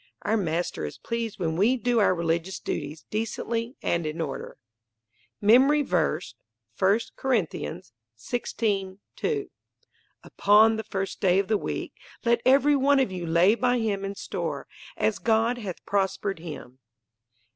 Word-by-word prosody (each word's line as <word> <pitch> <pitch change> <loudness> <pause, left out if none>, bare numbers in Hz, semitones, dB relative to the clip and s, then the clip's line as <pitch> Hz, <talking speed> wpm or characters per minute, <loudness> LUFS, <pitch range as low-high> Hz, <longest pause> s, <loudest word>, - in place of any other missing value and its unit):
Our 215 - +1
Master 175 - -1
is 75 - -5
pleased 230 -2 -4
when 165 -3 -1
we 220 +9 +3
do 240 0 +1
our 200 -3 +4
religious 170 +2 -1
duties 150 +1 -5
"decently 230 +3 -2
and 170 -2 0
in 155 +2 -5
order." 145 -5 -5 0.8
MEMORY 265 +8 +5
VERSE, 175 - 0 0.5
I 195 +4 +4 0.2
Corinthians 160 - -2 0.2
16: 195 - -2 0.2
2 425 -3 -2 0.7
"Upon 215 +2 +4
the 220 - -3
first 195 -2 -4
day 185 -2 +4
of 195 +1 0
the 220 - +3
week - - -3 0.3
let 235 0 +3
every 280 +2 +5
one 280 0 +4
of 260 -7 +1
you 180 -2 -5
lay 170 +5 +5
by 245 +1 +1
him 210 -4 -1
in 195 0 -4
store, - - -4 0.3
as 215 - 0
God 230 +2 +2
hath 195 -6 -7
prospered 195 -1 -1
him." 145 -6 -9
205 Hz, 145 wpm, -26 LUFS, 170-235 Hz, 0.8 s, MEMORY